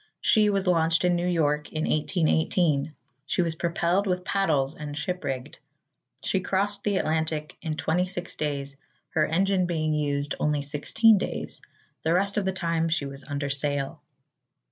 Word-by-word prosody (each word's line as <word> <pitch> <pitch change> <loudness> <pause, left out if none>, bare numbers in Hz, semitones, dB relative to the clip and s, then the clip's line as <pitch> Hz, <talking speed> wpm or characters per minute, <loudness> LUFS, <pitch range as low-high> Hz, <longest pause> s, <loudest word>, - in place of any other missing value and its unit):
She 215 -2 +4
was 200 -1 +1
launched 165 -1 +3
in 175 0 +3
New 175 +1 0
York 150 -4 +1
in 155 0 -2
1818. 155 -2 +1 0.3
She 180 - +1
was 165 -1 0
propelled 170 +4 0
with 180 0 -1
paddles 155 -8 +1
and 150 -2 -7
ship 180 +5 -3
rigged. 130 -2 -4 0.6
She 190 - +1
crossed 200 +2 0
the 205 -2 +1
Atlantic 160 -2 -1
in 155 -3 -3
26 180 +2 -1
days, 140 -2 -3 0.3
her 155 -2 +2
engine 185 +2 +2
being 155 -3 0
used 145 -1 0
only 150 -1 +1
16 170 +9 +3
days. - - -4 0.4
The 160 +2 +2
rest 200 +3 +1
of 205 - +1
the 190 - +1
time 165 -3 0
she 160 -3 0
was 140 0 -8
under 145 -1 -3
sail. 140 0 -2
160 Hz, 160 wpm, -26 LUFS, 150-180 Hz, 0.6 s, She